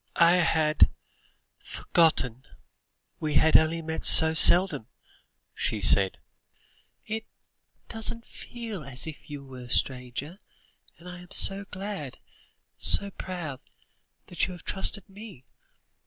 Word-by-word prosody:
"I 170 +1 +4
had 160 -3 +2 0.7
forgotten 130 -7 0 0.8
we 155 -2 -4
had 160 +2 +3
only 160 +1 +3
met 160 0 -6
so 160 0 +7
seldom," 175 - +5 0.7
she 110 - -2
said; 100 -2 +4 0.9
"it 220 +1 -6 0.6
doesn't 230 +1 -3
feel 225 -8 -9
as 130 -2 -3
if 155 -1 -11
you 145 -2 -9
were 130 -1 -12
a - - -15
stranger; 130 - -2 0.6
and 170 - -16
I 180 0 -10
am 180 0 -15
so 195 +1 0
glad, 190 -8 -7 0.6
so 200 0 +4
proud, 175 -9 -7 0.7
that 175 - -2
you 185 - -8
have 175 - -13
trusted 195 +1 -3
me. 200 - -13
165 Hz, 120 wpm, -26 LUFS, 140-195 Hz, 0.9 s, so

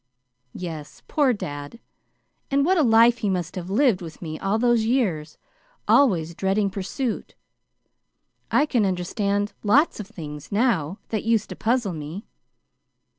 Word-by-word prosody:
"Yes. 160 -4 -7
Poor 285 -4 +3
dad! 145 -2 -6 0.7
And 280 0 +2
what 370 +1 +3
a - - +5
life 230 -1 +5
he 210 - 0
must 180 -1 -2
have 180 -1 -5
lived 220 -2 +3
with 165 -2 -9
me 155 -2 -6
all 195 +2 0
those 240 -1 +3
years 190 - 0 0.5
always 175 - +3
dreading 195 +3 0
pursuit. 210 +6 -4 1.1
I 295 - +3
can 245 -7 +1
understand 200 +2 -1
lots 265 +10 +3
of 210 - -6
things, 150 -9 -9
now, 200 - +1
that 215 -3 -2
used 225 -2 +1
to - - -6
puzzle 230 -4 0
me. 160 +7 -7
205 Hz, 140 wpm, -24 LUFS, 175-235 Hz, 1.1 s, a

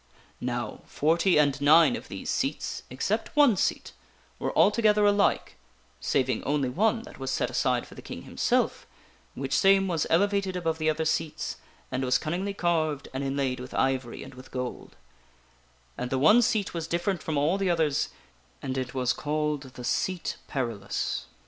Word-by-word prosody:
" - - -31
Now, - - -3
forty 165 +4 +2
and 145 -2 +2
nine 160 +10 +6
of - - -8
these - - -7
seats, - - -2
except - - -2
one 285 -7 +6
seat, - - -1 0.5
were - - -1
altogether 210 -2 +4
alike 205 0 +2 0.4
(saving 130 -1 0
only 140 -2 0
one 220 - +1
that - - -13
was 135 0 -3
set 135 - -1
aside - - +1
for - - -14
the - - -10
King - - -8
himself, - - 0 0.5
which 135 +1 -2
same 195 0 +5
was 165 -4 0
elevated 200 +2 +2
above 165 -3 -1
the 155 0 +2
other 160 +1 0
seats, 160 -1 -2 0.3
and 130 0 -1
was 125 0 +3
cunningly 185 +6 -3
carved 160 -6 0
and 135 +1 -3
inlaid 135 -2 -1
with 125 0 -8
ivory 130 -3 -1
and 135 - -11
with 130 +1 -13
gold), 125 -1 -5 1.0
and 125 0 -3
the 135 - 0
one 155 - +6
seat 215 -3 0
was 165 -2 -4
different 175 +2 -1
from 155 -2 -2
all 155 +7 +2
the 195 -2 +1
others, 160 -5 +1 0.5
and 130 0 -3
it 130 0 -5
was 130 -1 +1
called 150 -1 -1
the 125 - -8
SEAT 185 +7 -1
PERILOUS. 115 -8 -3
155 Hz, 170 wpm, -27 LUFS, 135-185 Hz, 1.0 s, nine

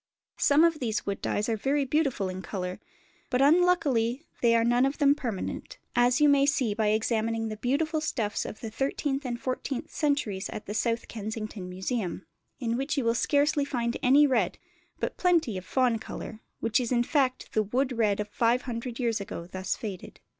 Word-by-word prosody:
Some 290 +3 +5
of 330 -2 +3
these 225 -4 -2
wood 200 -1 -3
dyes 210 - -1
are 230 - +1
very 275 +6 0
beautiful 270 -8 0
in 185 0 -5
colour; 180 -2 -4 0.5
but 250 - +1
unluckily 290 -5 +3 0.2
they 230 -1 +4
are 230 - +4
none 240 +2 +3
of 275 +1 +1
them 285 -1 +5
permanent, 240 -9 -5 0.2
as 245 0 +4
you 300 - +6
may 280 -1 +5
see 265 -7 +1
by 215 0 0
examining 225 +1 0
the 215 - -5
beautiful 310 +7 0
stuffs 225 -9 -1
of 215 - -8
the 225 - -5
thirteenth 275 +3 -1
and 240 -1 -3
fourteenth 260 +3 -3
centuries 280 - 0
at - - -6
the 205 - -5
South 230 +1 0
Kensington 215 -3 -5
Museum, 190 0 -3 0.3
in 235 -2 -1
which 275 +3 -2
you 275 - +1
will 230 - +3
scarcely 290 +4 +2
find 240 -4 -2
any 275 +4 +6
red, 240 -10 +1 0.4
but - - -3
plenty 335 - +2
of 185 0 -5
fawn 250 -4 +2
colour, 220 0 -8 0.2
which 230 +1 +2
is 245 -1 -2
in 240 -1 +3
fact 260 -1 0
the 215 - +3
wood 255 +6 0
red 215 -4 +1
of 210 - -2
500 235 +1 -1
years 230 -4 0
ago 170 -3 -6
thus 185 +1 -3
faded. 200 -5 -7
240 Hz, 190 wpm, -28 LUFS, 215-280 Hz, 0.5 s, you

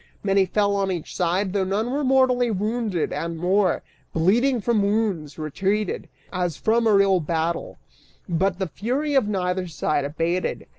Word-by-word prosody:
Many 195 -1 +3
fell 200 +1 +1
on 195 -1 0
each 175 -4 -5
side, 185 +2 0
though 200 -2 +1
none 205 +6 -1
were 290 +2 -1
mortally 255 -2 +3
wounded, 215 -3 -1
and 165 +2 -3
more, 185 +2 +1 0.3
bleeding 235 +10 +3
from 220 0 +1
wounds, 200 -7 -1
retreated, 195 +7 -2 0.2
as 180 -4 -1
from 230 +1 +2
a 215 - +4
real 195 -2 +4
battle, 165 +1 -2 0.5
but 180 +1 0
the 190 - -1
fury 260 - -2
of 265 -6 +3
neither 185 -2 -1
side 155 -2 -1
abated. 165 +5 -2
195 Hz, 155 wpm, -23 LUFS, 175-220 Hz, 0.5 s, a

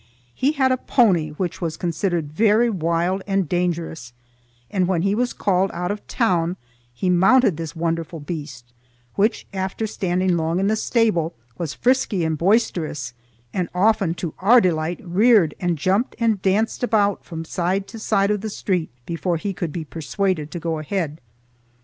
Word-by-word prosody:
He 275 - +1
had 265 -3 +2
a 255 - +2
pony 190 - +2
which 175 +3 -4
was 165 -2 -2
considered 170 -3 -1
very 220 +5 +3
wild 175 +1 0
and 195 -3 +1
dangerous, 165 -7 -2 0.6
and 185 -4 +1
when 175 -3 +1
he 195 0 +2
was 245 +3 0
called 190 0 +1
out 180 +2 -2
of 205 0 -6
town 180 -7 +1 0.3
he 120 +10 -3
mounted 190 +4 +4
this 165 0 -6
wonderful 165 0 -2
beast, 145 -7 -7 0.4
which, 215 +3 +1
after 190 +3 -2
standing 185 -3 0
long 165 +2 0
in 195 - +1
the 215 +2 +2
stable, 215 - +1 0.2
was 155 -5 -3
frisky 240 - +1
and 160 -2 -1
boisterous, 165 - 0 0.4
and 180 -2 -1
often 195 -3 +2
to 170 -3 -4
our 230 +7 +6
delight 170 -3 0
reared 195 -2 +4
and 175 -2 0
jumped 195 - 0
and 225 -5 +1
danced 200 +4 +1
about 205 -5 +1
from 165 -1 -7
side 185 +4 -1
to 225 - -8
side 200 -2 +2
of 210 -2 0
the 220 - -3
street 185 -5 -1 0.2
before 170 +1 -1
he 195 +5 -3
could 170 -3 -4
be 160 +1 -5
persuaded 165 +1 -2
to 175 - -5
go 165 -1 -2
ahead. 155 -1 -3
180 Hz, 170 wpm, -22 LUFS, 165-205 Hz, 0.6 s, our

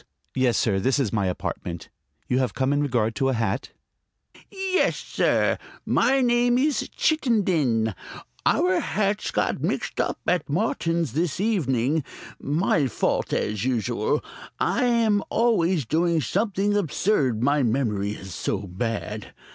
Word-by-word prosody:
"Yes, 130 -2 +2
sir. 100 -3 +1
This 130 +8 +1
is 130 -8 0
my 100 -4 +1
apartment. 85 -1 -4 0.4
You 125 - +1
have 130 -2 -1
come 135 +1 +1
in 145 - +1
regard 120 -6 0
to 135 - +2
a - - +1
hat?" 115 -2 -1 0.8
"Yes, 385 -1 0
sir. - - +1 0.3
My 270 +1 +3
name 240 0 +3
is 285 +2 0
Chittenden. 175 - +1 0.5
Our 180 0 +3
hats 205 0 -1
got - - -1
mixed - - -2
up - - -2
at 175 -4 0
Martin's 165 - 0
this 165 +2 -1
evening; 155 - +1 0.4
my 150 -1 +1
fault, 120 - -1
as 105 0 -1
usual. 120 -5 0 0.4
I 250 - +1
am 230 -4 +3
always 185 - +2
doing 165 +6 +1
something 200 - 0
absurd, 150 - +1
my 145 +2 +3
memory 110 -5 0
is 95 -3 -9
so - - -2
bad. 105 +2 -4
145 Hz, 135 wpm, -24 LUFS, -, 0.8 s, My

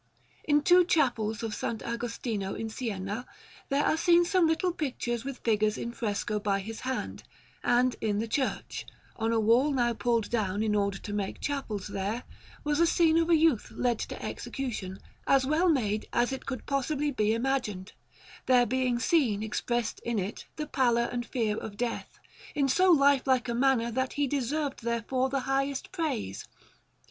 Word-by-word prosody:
In 295 -1 +3
two 360 +1 +6
chapels 235 -10 +1
of 225 - -2
S. - - -5
Agostino 230 -3 -3
in 225 0 -4
Siena 215 -1 -4 0.4
there 280 +1 +2
are - - +3
seen 345 +1 +5
some 360 -2 +3
little 325 +3 +1
pictures 245 -7 -3
with 275 -1 -5
figures 215 -1 +2
in 235 - -4
fresco, 210 -2 -2
by 200 -1 0
his 220 +3 -6
hand; 260 0 -4 0.4
and 245 0 +3
in 210 -2 0
the 225 +2 -1
church, 260 +4 -2 0.3
on 225 0 -1
a 230 - +2
wall 235 +6 +4
now 240 -3 +1
pulled 230 -1 0
down 210 -3 0
in 215 -1 +1
order 200 -1 +1
to 205 - -7
make 200 -2 -3
chapels 265 -9 -3
there, 205 +5 -3 0.4
was 295 0 0
a 335 - +5
scene 330 -1 +4
of 330 0 +1
a 335 - +6
youth 310 -8 +3
led 240 -3 0
to - - -5
execution, 215 -9 -4 0.3
as 270 -1 +4
well 315 +6 +3
made 215 -8 +1
as 240 +2 +1
it 265 - -7
could 260 -2 -4
possibly 285 +2 0
be 215 -3 +1
imagined, 230 -7 -2 0.5
there 250 -1 +5
being 255 0 0
seen 240 - +2
expressed 235 +1 -2
in 235 -1 -2
it 195 +1 -4
the 305 - -3
pallor 240 -5 +2
and 240 -1 -3
fear 220 -4 -1
of 205 -2 -7
death, 235 -1 -3 0.4
in 280 -2 +2
so 365 +8 +4
lifelike 275 -4 +4
a 235 - -1
manner 240 -1 +2
that 260 +2 -1
he 290 -1 +1
deserved 280 +1 -2
therefore 235 +3 0
the 270 0 -1
highest 270 +1 -1
praise. 295 - -3
245 Hz, 175 wpm, -29 LUFS, 220-275 Hz, 0.5 s, two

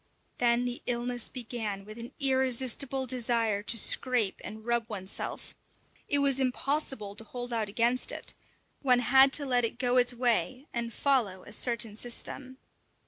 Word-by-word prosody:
Then 240 0 +2
the 245 0 -4
illness 245 -1 -1
began 220 -5 -5
with 215 +2 -10
an 235 +1 -8
irresistible 265 0 +1
desire 230 -4 0
to 230 +2 +4
scrape 235 -3 +1
and 220 +1 -8
rub 235 -1 -1
oneself. 195 -3 -4 0.5
It 285 - +3
was 280 -1 +3
impossible 265 -4 -1
to 225 - -3
hold 245 +2 -7
out 220 -3 -1
against 235 +4 +1
it; - - -5 0.5
one 255 -3 +4
had 265 +3 +5
to 290 - +2
let 250 -2 +1
it 230 +1 -2
go 250 -1 +1
its 245 0 +4
way 250 +2 0
and 235 -1 -3
follow 230 -8 0
a - - -12
certain 225 -1 +2
system. 255 +3 -3
245 Hz, 155 wpm, -29 LUFS, 225-255 Hz, 0.5 s, had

